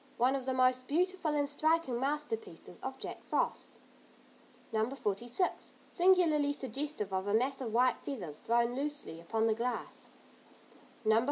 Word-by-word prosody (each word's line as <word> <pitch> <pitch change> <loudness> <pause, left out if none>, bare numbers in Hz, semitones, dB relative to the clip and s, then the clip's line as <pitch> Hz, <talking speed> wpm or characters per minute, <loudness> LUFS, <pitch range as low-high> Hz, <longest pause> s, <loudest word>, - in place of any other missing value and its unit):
One 255 +3 +3
of 265 -1 -4
the 260 - +1
most 255 0 +3
beautiful 345 0 +1
and 290 -1 +2
striking 300 -3 +1
masterpieces 300 - -3
of - - -4
Jack - - -6
Frost. - - 0 1.0
No. 220 +1 +2
46. 245 - -1 0.2
Singularly 335 -6 +4
suggestive 270 -7 -3
of 190 +1 -1
a 205 - +2
mass 265 +4 +1
of 235 -4 -3
white 250 +2 +4
feathers 180 - -5
thrown 235 +1 +2
loosely 285 - -3
upon 220 +6 0
the 225 - +4
glass. 240 +3 -4 1.0
No. 220 +1 +5
260 Hz, 145 wpm, -33 LUFS, 225-295 Hz, 1.0 s, No